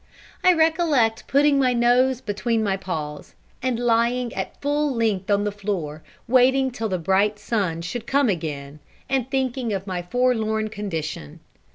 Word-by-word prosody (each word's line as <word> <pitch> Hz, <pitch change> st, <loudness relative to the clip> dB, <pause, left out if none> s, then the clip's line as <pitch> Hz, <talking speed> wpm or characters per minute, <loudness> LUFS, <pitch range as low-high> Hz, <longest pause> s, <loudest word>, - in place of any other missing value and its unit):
I 365 Hz, -, +7 dB
recollect 320 Hz, -9 st, +2 dB
putting 285 Hz, 0 st, +4 dB
my 255 Hz, -2 st, +3 dB
nose 245 Hz, +2 st, +3 dB
between 220 Hz, +2 st, -1 dB
my 200 Hz, -2 st, +1 dB
paws, 155 Hz, -6 st, -6 dB, 0.3 s
and 255 Hz, -2 st, -1 dB
lying 240 Hz, 0 st, +1 dB
at 190 Hz, -, -5 dB
full 290 Hz, +1 st, 0 dB
length 215 Hz, -4 st, 0 dB
on 205 Hz, 0 st, +3 dB
the 205 Hz, -, -1 dB
floor, 190 Hz, -7 st, -4 dB, 0.3 s
waiting 260 Hz, +2 st, +4 dB
till 225 Hz, -2 st, -3 dB
the 185 Hz, -, 0 dB
bright 195 Hz, +5 st, +1 dB
sun 195 Hz, -6 st, -2 dB
should 235 Hz, +6 st, -5 dB
come 280 Hz, -1 st, +3 dB
again, 150 Hz, -6 st, -3 dB, 0.3 s
and 265 Hz, -2 st, -1 dB
thinking 260 Hz, -4 st, -1 dB
of 195 Hz, -1 st, -3 dB
my 185 Hz, -3 st, -3 dB
forlorn 220 Hz, +1 st, 0 dB
condition. 160 Hz, -, -5 dB
225 Hz, 155 wpm, -23 LUFS, 190-255 Hz, 0.3 s, I